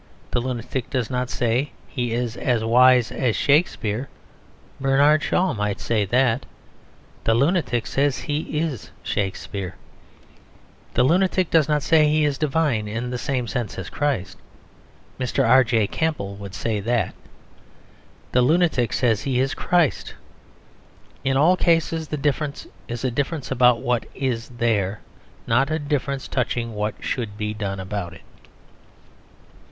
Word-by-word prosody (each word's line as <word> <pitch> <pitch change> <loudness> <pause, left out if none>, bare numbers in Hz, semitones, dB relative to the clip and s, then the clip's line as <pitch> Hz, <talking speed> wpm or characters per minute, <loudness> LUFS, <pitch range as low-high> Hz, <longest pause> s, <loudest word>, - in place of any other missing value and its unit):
The - - +1
lunatic 125 0 -4
does 125 -4 -2
not 125 0 -1
say 125 +4 0
he 120 -4 -3
is 120 0 -2
as 120 -3 0
wise 125 +1 +5
as 120 -5 0
Shakespeare; 135 - +1 0.7
Bernard 140 +3 +4
Shaw 185 +3 +1
might 105 -2 -2
say 110 -3 0
that. 120 +3 +2 0.8
The 115 - +3
lunatic 135 -3 +1
says 140 0 +1
he 150 0 -3
is 150 - -2
Shakespeare. 95 -1 -3 1.2
The - - +4
lunatic 185 +4 +2
does 160 -2 +4
not 150 -2 +1
say 155 -1 +4
he 155 0 +3
is 145 -2 -1
divine 145 -8 +1
in 115 +4 -3
the 125 - -3
same 130 -2 -1
sense 120 -3 -4
as 95 -1 -6
Christ; 130 - -2 0.8
Mr. 125 -2 +1
R.J. 120 -4 +4
Campbell 150 -12 -2
would 100 -2 -9
say 105 +3 -1
that. 115 +2 0 1.2
The 125 - +3
lunatic 155 -3 +2
says 115 -5 +2
he 130 -2 0
is 135 +2 +1
Christ. 175 -6 0 1.1
In 135 0 +1
all 165 +6 +5
cases 165 -2 +1
the 150 - -3
difference 145 0 -1 0.2
is 120 +1 -5
a 130 - 0
difference 140 +3 -3
about 125 -2 +4
what 120 -3 0
is 125 -4 -2
there; 105 -4 0 0.4
not 135 +5 +2
a 155 - 0
difference 145 -2 -2
touching 120 -2 -2
what 105 0 -2
should 110 -5 -3
be 105 0 -2
done 100 -2 -4
about 95 -3 -4
it. - - -14
125 Hz, 140 wpm, -23 LUFS, 115-145 Hz, 1.2 s, wise